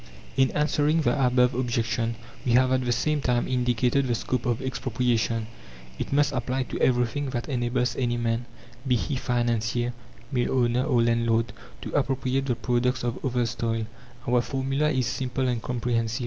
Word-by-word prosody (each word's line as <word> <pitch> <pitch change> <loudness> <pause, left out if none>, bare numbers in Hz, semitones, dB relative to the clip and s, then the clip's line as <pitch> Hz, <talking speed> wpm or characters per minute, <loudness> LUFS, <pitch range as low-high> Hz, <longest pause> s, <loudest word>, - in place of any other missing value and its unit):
In 130 -1 +4
answering 150 +1 +2
the - - +2
above 125 0 +4
objection 115 -2 -1 0.3
we 120 - +1
have 130 +1 +4
at 130 0 +2
the 120 - +1
same 150 +5 +1
time 120 -2 +1
indicated 125 +1 +1
the 120 - +1
scope 125 +1 -2
of 120 -2 +1
Expropriation. 120 -3 0 0.5
It - - -3
must 145 +1 +3
apply 130 0 -1
to - - -2
everything 130 +3 +1
that 120 -2 -3
enables 125 -2 0
any 120 -2 0
man 115 0 -1 0.4
be 125 - +4
he 135 +4 -1
financier, 120 -1 0 0.4
mill 125 0 +1
owner, 120 +1 +2
or 120 -2 +3
landlord 115 -1 +1 0.3
to - - -6
appropriate 135 0 0
the 125 - +1
product 125 +1 0
of 120 0 -3
others' 120 -3 0
toil. 115 -1 -1 0.4
Our 125 0 +3
formula 135 +3 0
is 130 -4 +1
simple 130 +2 -1
and 120 -2 -1
comprehensive. 115 -2 -1
125 Hz, 165 wpm, -26 LUFS, 120-130 Hz, 0.5 s, In